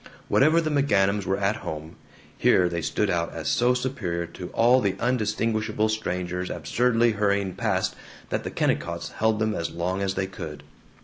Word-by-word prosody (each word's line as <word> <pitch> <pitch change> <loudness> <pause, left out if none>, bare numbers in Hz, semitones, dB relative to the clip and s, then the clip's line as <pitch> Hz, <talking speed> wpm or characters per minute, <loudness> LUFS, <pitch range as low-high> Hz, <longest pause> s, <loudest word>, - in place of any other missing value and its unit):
Whatever 155 +4 +5
the 155 -1 -1
McGanums 105 -9 +2
were 95 +1 +1
at 100 +2 0
home, 80 +1 -7 0.4
here 90 - +4
they 85 -1 -2
stood 105 +6 0
out 85 -1 -1
as - - -4
so 125 +1 +3
superior 110 -10 -2
to 90 +1 -8
all 120 +6 +4
the 100 -2 0
undistinguishable 110 -2 0
strangers 90 -4 -2
absurdly 115 +8 +2
hurrying 100 -2 0
past - - -1 0.3
that - - -2
the - - -4
Kennicotts 85 0 -1
held 110 0 +1
them 110 0 0
as 85 -3 -2
long 90 +3 -2
as 95 0 -1
they 95 - 0
could. 75 -6 -8
100 Hz, 170 wpm, -25 LUFS, 90-115 Hz, 0.4 s, Whatever